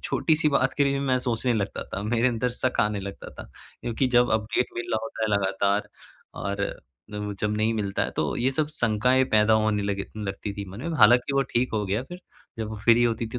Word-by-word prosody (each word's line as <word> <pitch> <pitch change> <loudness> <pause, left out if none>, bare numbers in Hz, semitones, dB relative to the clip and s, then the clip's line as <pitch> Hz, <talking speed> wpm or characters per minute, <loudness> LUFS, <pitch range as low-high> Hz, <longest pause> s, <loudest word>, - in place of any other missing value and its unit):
छोटी-सी 155 -1 +2
बात 135 -2 +2
के 145 - +3
लिए 140 0 0
मैं 130 -2 +1
सोचने 120 0 -1
लगता 100 -3 -2
था। 100 - -5
मेरे 120 +3 +2
अंदर 125 +1 -1
शक 125 +1 -1
आने 105 -1 0
लगता 100 0 -8
था - - -10 0.4
क्योंकि 120 +2 -1
जब 120 0 +5
अपडेट 110 +3 +1
मिल 120 - -4
रहा 110 - +2
होता 115 0 -5
है 110 - +1
लगातार 100 +1 +1 0.5
और 100 0 -3 0.8
जब 105 0 0
नहीं 110 +1 +1
मिलता 100 -2 -1
है, - - -1
तो - - -2
ये 125 +3 +1
सब 150 +3 0
शंकाएँ 125 -1 +2
पैदा 110 0 +5
होने 110 -1 +2
लगी 100 -1 -2 0.2
लगती 100 +1 -4
थी 100 - -5
मन 100 +5 -9
में। 165 0 -3
हालाँकि 120 +5 +5
वो 140 - +3
ठीक 125 +2 +1
हो 105 -1 0
गया 105 +6 -1
फ़िर 175 +6 -10 0.4
जब 110 -1 -3
वो 110 - -6
फ्री 115 +3 +4
होती 115 -1 0
थी, 120 +3 -5
115 Hz, 220 wpm, -25 LUFS, 105-125 Hz, 0.8 s, जब